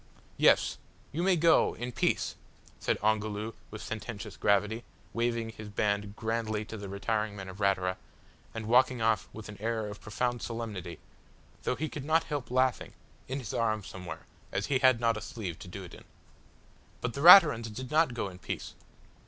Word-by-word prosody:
"Yes, - - +4 0.3
you 160 - -2
may 185 +1 +4
go 165 0 +4
in 120 +1 -4
peace!" - - 0 0.5
said - - 0
Ongoloo 110 0 0 0.2
with 110 - -8
sententious 110 -1 -6
gravity, 105 +3 +1 0.3
waving 115 -1 0
his 110 -1 -9
band 105 0 -1
grandly 110 -1 -2
to 110 - -8
the 100 -2 -7
retiring 105 +1 -1
men 95 -2 -7
of 95 +1 -9
Ratura, 95 -2 +1 0.5
and 110 -1 -6
walking 125 +2 +4
off 110 -1 +1
with 110 - -9
an 105 -1 -9
air 115 -1 -1
of 105 0 -8
profound 120 +3 -2
solemnity, 105 -7 -5 0.6
though - - -1
he 155 - -2
could 150 -2 -6
not 160 +3 +3
help 145 -7 -4
laughing 130 0 +1 0.3
in 130 - -3
his 125 -7 -5
arm, 110 -2 0
somewhere, 90 -2 -8 0.3
as 100 - -1
he 135 -2 +1
had 130 -3 +5
not 115 -1 +2
a - - -5
sleeve 105 -10 -6
to - - -10
do 95 +2 -7
it 90 - -11
in. - - -13 0.9
But 125 - -3
the 140 - -4
Raturans 155 - +9
did 125 +4 -7
not 155 -5 +3
go 115 - -2
in 90 -1 -10
peace. - - -5
110 Hz, 180 wpm, -30 LUFS, 105-125 Hz, 0.9 s, Raturans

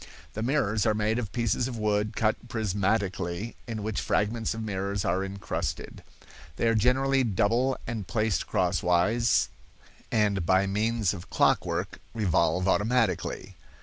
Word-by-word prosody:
The 110 - -4
mirrors 115 -4 +1
are 110 - +2
made 110 +2 +1
of 110 -5 -4
pieces 120 +1 0
of 125 -3 -5
wood 105 -1 0
cut 110 +1 0
prismatically 100 -2 -1
in 110 -3 -4
which 110 -1 -2
fragments 110 +2 0
of 115 - -4
mirrors 100 -1 -2
are 95 - +1
incrusted. 95 -1 -4 0.5
They 115 - 0
are 115 - +4
generally 130 +4 +3
double 120 +5 +1
and 110 -5 -4
placed 110 -3 0
crosswise, 90 +6 +2 0.6
and 105 -4 +2
by 95 +3 +3
means 105 0 0
of 90 -3 -9
clockwork - - +1 0.2
revolve 90 -3 +1
automatically. 110 +1 0
110 Hz, 135 wpm, -27 LUFS, 100-115 Hz, 0.6 s, are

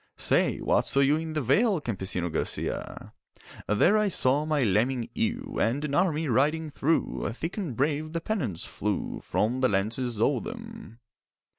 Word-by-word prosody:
'Say, - - +2
what - - +2
saw 140 - +2
you 140 +2 +4
in 160 0 -4
the 155 - -1
vale, 185 - +3
Campesino 95 - -3
Garcia?' 80 -2 -3 0.5
'There 175 - +4
I 210 - +2
saw 145 -5 +2
my 150 -3 +1
lambing 115 +4 +1
ewe 235 +4 -2
And 135 +7 +1
an 140 - -4
army 165 -2 +1
riding 150 +5 +1
through, 155 +3 0
Thick 165 +8 -5
and 175 - -4
brave 150 +4 0
the 165 - -2
pennons 150 - -3
flew 105 -1 -3
From 120 +5 0
the 130 -1 +3
lances 110 +4 -1
o'er 130 +4 +2
them. 225 - -9
145 Hz, 160 wpm, -27 LUFS, 115-165 Hz, 0.5 s, you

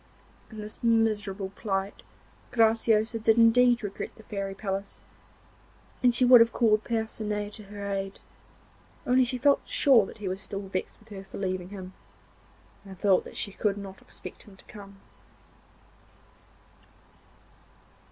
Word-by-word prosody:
In 220 - -11
this 210 +1 -8
miserable 215 -4 +1
plight 195 -1 -3 0.5
Graciosa 225 -1 +2
did 220 +1 +3
indeed 240 +1 +5
regret 200 -1 -5
the 220 - -15
fairy 195 -2 -5
palace, 195 -1 -4 1.0
and 250 - +5
she 240 +1 +2
would 245 -1 +9
have 230 0 +4
called 215 -3 +2
Percinet 215 -2 -3
to 215 - -10
her 200 0 -7
aid, 195 0 -4 0.9
only 255 +1 +4
she 250 +1 -2
felt 280 +3 +3
sure 275 - +3
he 210 -3 -6
was 190 +2 -3
still 200 -1 -5
vexed 185 -1 -5
with 220 - -20
her 195 -2 -8
for 190 - -10
leaving 185 -2 -3
him, 190 -2 -9 0.9
and 195 -2 -11
thought 195 0 +3
that - - -9
she 200 - -2
could 205 0 -1
not 195 -1 -9
expect - - -9
him 205 - -15
to - - -19
come. 200 -1 -13
210 Hz, 140 wpm, -27 LUFS, 195-230 Hz, 1.0 s, would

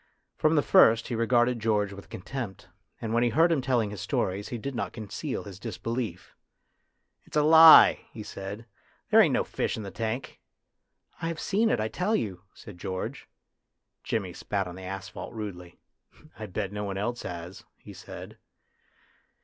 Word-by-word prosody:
From 155 +1 +2
the 145 - +3
first 115 +1 +5
he 120 - -2
regarded 120 +1 +2
George 105 -2 0
with 100 0 -12
con - - -8
tempt, 120 -9 -6 0.3
and 115 -1 -4
when 120 - +3
he 120 - +3
heard 165 +9 +4
him 155 -5 +2
telling 120 -5 0
his 100 -3 -7
stories 95 +2 -1
he 120 - -4
did 135 +5 -5
not - - -3
conceal 110 +6 -5
his 95 -3 -10
disbelief. 115 -4 -5 0.4
" - - -49
It's - - -4
a 150 - +4
lie," 160 +1 +9
he 110 - -8
said; 100 +3 -7 0.2
" - - -37
there - - +8
ain't - - +4
no - - +2
fish - - -2
in 110 - -5
the 100 - -7
tank." 115 +3 -4 0.4
" - - -33
I 165 - -1
have 165 -1 -4
seen 220 +3 +1
it, - - +1
I 110 - 0
tell 185 - 0
you," 95 - -3
said 100 -5 -12
George. 95 -1 -5 0.7
Jimmy 95 -5 -2
spat 100 +1 -2
on 90 - -7
the 95 - -10
asphalt 95 +4 -7
rudely. 90 -5 -7 0.3
" 155 - -23
I 110 - -5
bet 100 +1 -3
no 105 0 -4
one 100 -1 -4
else 120 +4 -2
has," 85 +1 -7
he - - -12
said. - - -10
110 Hz, 190 wpm, -27 LUFS, 100-125 Hz, 0.7 s, lie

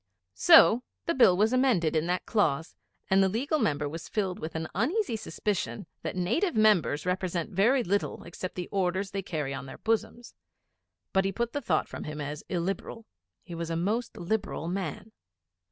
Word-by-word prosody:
So 190 - +7 0.2
the 335 - +1
Bill 195 - +5
was 215 +4 +3
amended 240 - +2
in 155 +1 +1
that 180 +1 -1
clause; 160 - 0 0.4
and 190 +1 +5
the 190 - +4
Legal 275 - 0
Member 150 - 0
was 160 +3 -7
filled 190 -4 -2
with 155 +1 -6
an 160 0 -2
uneasy 285 - 0
suspicion 195 - -3 0.2
that - - -4
Native 235 - 0
Members 180 - +3
represent 180 +1 -1
very 235 +8 +3
little 200 +1 -1
except 175 +2 -7
the 180 -1 -4
Orders 190 0 -1
they 195 - -2
carry 150 -7 -3
on 135 - -6
their - - -9
bosoms. 225 +1 -2 0.8
But 190 - +3
he 195 - 0
put 235 +4 -2
the 285 - -2
thought 175 - 0
from - - -7
him 150 0 -6
as 150 +1 -5
illiberal. 195 +5 -3 0.4
He 175 - -10
was 165 0 -4
a 165 - -1
most 215 +8 -1
liberal 175 -3 -2
man. 185 +3 -4
190 Hz, 180 wpm, -28 LUFS, 165-220 Hz, 0.8 s, So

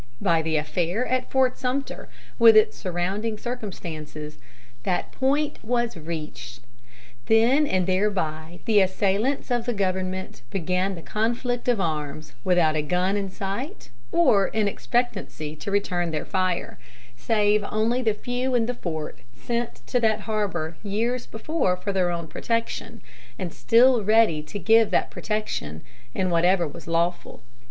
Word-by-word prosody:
By 165 -1 +2
the 160 -1 0
affair 175 +9 -1
at 255 0 -1
Fort 260 -1 +2
Sumter, 265 +2 -3 0.3
with 225 -1 +8
its 215 - +5
surrounding 195 +4 -2
circumstances, 165 -10 -6 0.4
that 180 +7 -1
point 285 +3 0
was 240 0 0
reached. 155 -6 -7 0.7
Then 240 +7 +4
and 185 -5 +1
thereby 175 -4 -1
the 215 -2 +5
assailants 200 +8 0
of 240 -1 +1
the 240 - 0
government 185 -3 -2
began 185 +3 -1
the 165 - -10
conflict 240 +3 -1
of 240 -4 +3
arms, 155 -3 -3
without 175 -4 +3
a 155 - +2
gun 180 +5 0
in 200 -1 -2
sight 200 - -5 0.2
or 195 +3 +4
in 215 -1 0
expectancy 200 -9 -2
to 175 - -5
return 180 -4 0
their 155 -2 -3
fire, 185 -2 -1 0.4
save 210 - +2
only 225 +4 +1
the 220 -4 +1
few 245 +4 -2
in 230 -2 +3
the 250 - -1
fort 160 -9 -5 0.2
sent 235 0 -3
to 245 - +1
that 220 -2 +2
harbor 195 -7 -2
years 230 +4 -1
before 220 - -1
for 200 +2 -3
their 185 -2 +2
own 170 -1 -3
protection, 230 +7 -3 0.4
and 180 -4 -4
still 240 0 +4
ready 215 -7 +4
to 155 +7 -7
give 220 +4 +4
that - - +1
protection 145 - -3 0.3
in 185 -1 0
whatever 175 +1 +3
was 145 - -11
lawful.... 170 +1 -1
200 Hz, 145 wpm, -25 LUFS, 170-230 Hz, 0.7 s, with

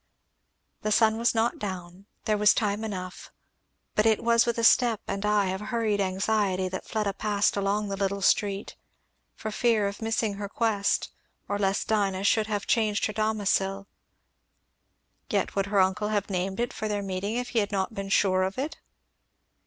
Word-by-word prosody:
The 215 - -1
sun 220 +1 +3
was 235 0 +2
not 225 +1 +1
down, 185 -1 -6 0.2
there 215 - +2
was 210 0 +5
time 210 0 0
enough, 185 -4 -6 0.6
but 210 +1 +3
it 220 -1 +2
was 235 0 +4
with 235 - 0
a 230 - -1
step 230 -1 +5
and 195 0 -3
eye 210 -2 +2
of 190 +1 -4
hurried 215 -2 0
anxiety 190 0 0
that 185 - -6
Fleda 210 -3 -1
passed 205 0 +1
along 200 +1 0
the 195 - -2
little 195 0 -2
street, 200 0 +1 0.6
for 215 - -5
fear 220 -2 +2
of 200 +2 -6
missing 225 -1 0
her 200 -1 -5
quest 210 -2 0 0.4
or 205 0 -2
lest 195 0 0
Dinah 195 -3 0
should 215 +1 +2
have 205 -2 -2
changed 215 -3 +1
her 215 - -2
domicil. 200 -2 0 1.4
Yet - - -1
would 195 0 0
her 200 0 +1
uncle 190 +3 +2
have 205 -1 -1
named 190 +2 -2
it 240 0 -1
for 215 - -4
their 205 -1 -2
meeting 195 +3 -3
if 245 0 -2
he 245 -2 +1
had 205 -1 -1
not 195 +2 -1
been 195 -2 -5
sure 185 -2 +3
of 190 +3 -1
it? 285 +4 -3
205 Hz, 180 wpm, -27 LUFS, 195-220 Hz, 1.4 s, was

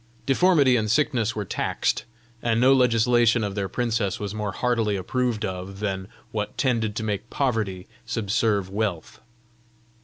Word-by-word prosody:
Deformity 140 -3 +4
and 110 -1 -1
sickness 115 -3 +1
were 105 -1 -3
taxed; - - -1 0.4
and 115 -1 +1
no 130 +2 +6
legislation 120 -2 +3
of 100 -1 -2
their 100 -1 -2
princess 115 -3 -1
was 105 -1 -4
more 105 -2 -3
heartily 115 -1 0
approved 115 +3 -1
of 95 +1 -6
than 95 -2 -3 0.2
what 105 -1 -4
tended 115 -5 0
to 110 - -3
make 110 +1 -3
poverty 110 -9 -1 0.2
subserve 105 -3 0
wealth. 100 -4 -3
110 Hz, 145 wpm, -24 LUFS, 100-120 Hz, 0.4 s, no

